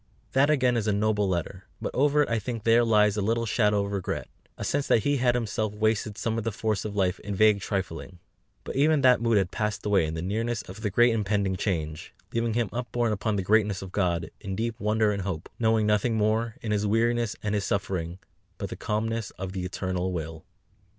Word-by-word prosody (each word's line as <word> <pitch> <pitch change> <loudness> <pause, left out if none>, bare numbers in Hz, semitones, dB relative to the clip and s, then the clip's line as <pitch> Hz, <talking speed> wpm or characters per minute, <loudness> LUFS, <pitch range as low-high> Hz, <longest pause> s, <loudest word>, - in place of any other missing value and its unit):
That 135 +2 +3
again 130 -5 +3
is 110 -2 -1
a - - +3
noble 105 -1 +1
letter; 90 +2 -3
but - - -4
over 145 +2 +3
it - - -4
I 115 -1 +1
think 115 0 -5
there 115 +1 +5
lies 105 -2 +3
a - - +1
little 115 +3 0
shadow 105 -2 +2
of 100 - -5
regret, 100 -2 -3 0.3
a - - -5
sense 145 0 -1
that 110 - +3
he 145 0 +2
had 120 -1 +2
himself 110 -2 -2
wasted 110 -1 0
some 115 0 -1
of - - -4
the 115 - -1
force 110 -1 -2
of 105 -1 -4
life 95 -2 +1
in 105 -1 -5
vague 105 0 +4
trifling; 95 -3 -4 0.5
but - - -6
even 150 +2 +3
that 125 -2 +5
mood 115 -2 +3
had 95 -2 +1
passed 105 -1 -2
away 100 -6 +3
in 80 - -4
the 80 - -4
nearness 115 +4 -2
of 95 +4 -10
the 105 - 0
great 120 +4 +4
impending 100 -3 0
change, 80 -5 -3 0.2
leaving 115 -1 0
him 120 -4 0
upborne 120 -1 -1
upon 105 +1 -1
the 95 - -1
greatness 105 -1 +2
of 95 - -9
God, 85 -5 0
in 95 -2 -5
deep 115 +2 -3
wonder 105 0 +2
and 100 -1 -2
hope, 90 -4 -4
knowing 110 -2 +3
nothing 105 +2 +2
more, 110 +1 +1
in 110 - -2
his 105 0 +1
weariness 115 +1 +1
and 105 -1 -1
his 105 -1 0
suffering, 95 -4 -2 0.4
but - - -4
the - - -5
calmness 110 0 -2
of 95 0 -5
the 95 -1 -4
Eternal 95 0 -2
Will. 80 -2 -5
105 Hz, 225 wpm, -27 LUFS, 95-115 Hz, 0.5 s, there